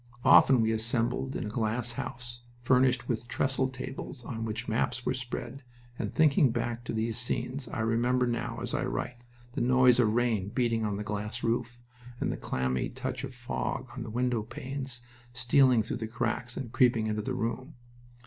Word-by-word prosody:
Often 130 -3 +7
we 110 0 +2
assembled 115 +4 0
in - - -2
a - - -3
glass 115 +2 0
house, 120 0 -6 0.2
furnished 125 -1 +3
with 120 -1 -2
trestle 130 +1 0
tables 130 0 -6
on 115 -2 -4
which 110 +2 -4
maps 120 +2 -1
were - - +1
spread, 130 +2 -5 0.4
and, - - -2
thinking 145 -3 +4
back 120 0 -2
to - - -3
these 110 +1 -1
scenes, 125 +2 -2
I 120 - -3
remember 120 +3 +2
now, 120 -1 -2
as - - -3
I - - 0
write, 120 0 -4 0.2
the - - -3
noise 125 0 +5
of 110 -3 +4
rain 110 -4 +1
beating 115 -1 +1
on 105 -1 -1
that 105 - -3
glass 105 +3 -4
roof, 120 +1 -1 0.4
and - - 0
the - - -2
clammy 65 0 -1
touch - - -4
of 135 - -4
fog 125 +1 -3
on 125 - -5
the 115 - -5
window 120 0 0
panes 130 +2 -6 0.3
stealing 125 -1 +4
through 110 - -3
the 110 -2 -4
cracks 120 +1 -2
and 120 -4 -5
creeping 120 -4 +3
into 105 0 -1
the 130 +4 -3
room. 125 +5 -3
120 Hz, 185 wpm, -29 LUFS, 115-125 Hz, 0.4 s, Often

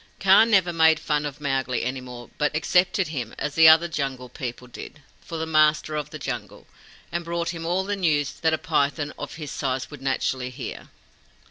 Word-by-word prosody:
Kaa 195 +3 +6
never 190 -6 +3
made 160 -1 +4
fun 150 -1 -1
of 145 0 -9
Mowgli 135 -4 -1
any 130 +2 -3
more, 125 -1 -10
but 150 0 0
accepted 180 +2 +2
him, 125 -7 -5
as 150 - -3
the 160 0 +8
other 160 +2 +6
Jungle 135 -5 -4
People 125 0 -6
did, 135 +4 -11 0.2
for 165 - -6
the 160 - -2
Master 155 -1 +2
of 150 -1 -3
the 155 - -8
Jungle, 105 -8 -6 0.5
and 170 0 -2
brought 170 0 -2
him 165 -1 -5
all 180 +2 +1
the 205 +1 -2
news 150 -7 +1
that 160 -1 +2
a 160 - +1
python 145 -2 -1
of - - -6
his 150 -3 -7
size 130 0 -3
would 145 -3 -10
naturally 130 -1 -1
hear. 125 - -8
150 Hz, 200 wpm, -24 LUFS, 135-165 Hz, 0.5 s, the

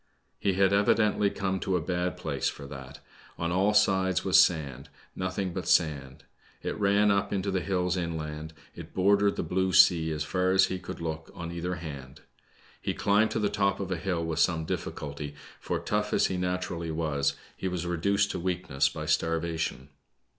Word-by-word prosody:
He 100 - +1
had 95 +1 +3
evidently 105 0 +3
come 95 -1 -2
to 95 - -1
a - - +2
bad 90 +2 -2
place - - -1
for 70 - -9
that. 70 0 -10 0.4
On 85 0 -2
all 95 +4 +3
sides 95 -4 +3
was - - +7
sand, 70 -4 -2
— - - -29
nothing 95 0 -2
but 90 -2 -4
sand. 70 -7 +1 0.4
It - - -2
ran 100 +1 +4
up 100 -1 +1
into 100 0 -1
hills 90 -1 0
inland, 80 -2 -4 0.2
it - - -11
bordered 100 +2 +3
the - - -2
blue 95 +3 0
sea 80 -3 +6
as 75 -1 -2
far 90 +3 +1
as 95 0 +5
he 95 - -3
could 90 - -8
look 80 -1 -4
on 85 -1 -6
either 85 +1 -3
hftid. 70 -6 -8 0.6
He - - -2
chmbed 105 +2 +3
to - - -2
the 105 - +2
top 100 -1 0
of 95 -2 -4
a - - +1
hill 85 -1 -2
with 80 -1 -2
some 80 -3 +2
difficulty, 75 -1 -5 0.2
for - - -2
tough 105 0 -1
as - - +4
he 95 - -1
naturally 90 -2 -2
was, 70 -3 0 0.2
he - - -4
was 90 -1 -3
reduced 100 +4 +1
to - - -4
weak 90 -2 -3
ness 70 -1 +3
by 75 - -6
starvation. 80 -2 -1
90 Hz, 190 wpm, -28 LUFS, 80-95 Hz, 0.6 s, was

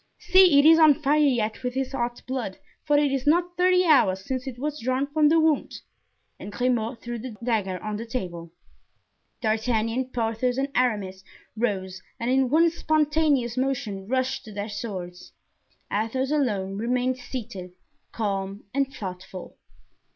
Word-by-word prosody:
See, 365 -5 +5
it 285 - +6
is 325 +1 +8
on 310 -3 +7
fire 300 0 +1
yet 240 -7 +1
with 250 0 -3
his 265 -1 -2
hot 240 -2 -3
blood, 255 -7 -4 0.3
for 295 -1 +3
it 290 -1 +2
is 270 +1 -2
not 350 +3 +2
thirty 365 0 +3
hours 190 - +3
since 260 0 -3
it 250 -2 -6
was 295 +3 -3
drawn 255 +3 0
from 300 +1 +2
the 325 +1 +4
wound." 315 -2 +1 0.7
And 205 - -8
Grimaud 240 0 -1
threw 240 -1 -5
the 240 -1 -7
dagger 210 -6 0
on 215 -1 -3
the 230 +2 -7
table. 175 -8 -5 0.9
D'Artagnan, 225 +2 0
Porthos 240 +1 -1
and 275 +1 0
Aramis 205 -7 0 0.3
rose 190 -5 -2 0.2
and 235 +1 -1
in 265 -1 +2
one 330 +4 +4
spontaneous 300 -6 +1
motion 245 -7 -2
rushed 260 +2 -1
to 220 - -10
their 205 +1 -5
swords. 190 -4 -7 0.6
Athos 245 +6 -1
alone 205 -10 0
remained 250 +2 0
seated, 210 -8 -7 0.4
calm 200 -2 -3
and 275 0 0
thoughtful. 185 -4 -8
250 Hz, 155 wpm, -25 LUFS, 210-280 Hz, 0.9 s, is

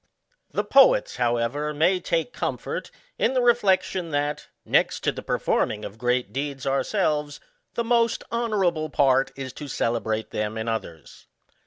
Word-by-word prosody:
The - - -1
poets, - - +4
however, 120 +6 0
may 175 +5 +3
take 170 +6 -1
comfort - - -4 0.3
in 265 - +2
the - - +4
reflec 235 -6 +4
tion, 180 -3 -4
that, 145 0 -2 0.2
next - - +2
to - - +1
the - - -7
performing 105 0 0
of 105 +2 -9
great 125 0 0
deeds 140 0 -4
ourselves, 150 +1 0 0.4
the 235 - 0
most 230 -1 +2
honourable 195 -9 0
part 135 -2 +3
is 135 -2 -6
to 145 - -8
celebrate 110 -3 -1
them 105 +1 -2
in 110 +1 -4
others. 110 -8 -6
145 Hz, 150 wpm, -25 LUFS, 120-195 Hz, 0.4 s, poets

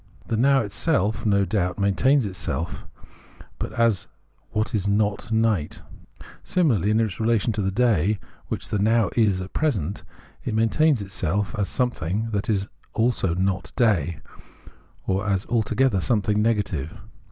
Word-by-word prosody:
The 115 - -2
Now 135 +4 +4
itself 110 - 0
no 100 -1 +3
doubt 90 -4 -1
maintains 115 +7 +3
itself, 90 -3 -4 0.7
but - - -3
as 115 -5 +2 0.4
what 110 +4 -2
is 100 -3 0
not 105 +2 0
night; 110 -8 0 0.6
similarly 120 - +2
in 110 +1 +3
its 110 -5 -1
relation 115 0 +1
to 105 - -2
the 95 - 0
day 105 -2 +2 0.3
which - - -4
the 105 - -1
Now 110 +1 +2
is 105 -5 +3
at 95 - -8
present, 105 - -1 0.4
it 110 - -2
maintains 115 +3 +2
itself 95 +1 -2
as 100 -2 -1
something 110 -3 -1
that 100 0 -2
is 100 -2 0 0.3
also 110 -7 +1
not 95 +1 -1
day, 90 - +1 0.8
or 95 +2 -1
as 95 -1 0
altogether 115 -2 +1
something 105 +2 +1
negative. 100 -10 -1
105 Hz, 140 wpm, -24 LUFS, 95-115 Hz, 0.8 s, Now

